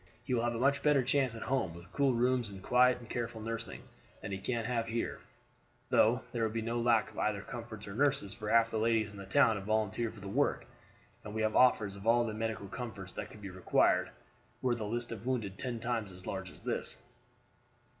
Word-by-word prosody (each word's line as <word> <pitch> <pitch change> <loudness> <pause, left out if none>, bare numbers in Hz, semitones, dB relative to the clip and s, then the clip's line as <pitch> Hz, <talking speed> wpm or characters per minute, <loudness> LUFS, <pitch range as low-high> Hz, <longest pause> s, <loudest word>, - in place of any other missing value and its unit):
He 130 - -2
will 120 - +2
have 120 0 0
a - - -2
much 140 +2 +3
better 145 -3 +4
chance 130 -2 +1
at 115 - -6
home, 95 -11 0
with 85 +2 -12
cool 140 -3 +3
rooms 125 -1 +2
and 95 -1 -10
quiet 125 +2 +5
and 120 -1 -12
careful 115 0 -3
nursing, 115 -2 -5 0.4
than - - -6
he 95 - -3
can 115 +2 -2
have 115 -1 -1
here; 115 +1 -2 0.7
though 120 +3 +4
there 120 - -2
would 110 -1 0
be 115 - -1
no 115 +1 -1
lack 115 -2 +3
of - - -8
either 105 -2 0
comforts 115 -4 -7
or 100 - -6
nurses, 135 -5 +1
for 105 -1 -5
half 115 0 +4
the 110 - 0
ladies 110 -1 +2
in 100 - -10
the 100 - -8
town 115 -2 +4
have 95 - -7
volunteered 110 +1 0
for - - -11
the 100 - -8
work, 135 +9 +1 0.6
and 105 0 -7
we 110 - 0
have 110 0 +1
offers 110 -6 +4
of 100 +2 -8
all 120 +1 +5
the 110 - -3
medical 110 -2 -3
comforts 100 -4 -6
that - - -5
could 105 - -13
be 95 - -6
required 95 0 +2 0.5
were 125 -1 +1
the 115 -3 -3
list 120 +2 -2
of 115 +1 -6
wounded 110 -7 -2
ten 125 -3 -3
times 115 -4 -2
as 90 0 -11
large 95 -1 -4
as - - -16
it - - +1
is." - - -4
115 Hz, 235 wpm, -33 LUFS, 105-120 Hz, 0.7 s, quiet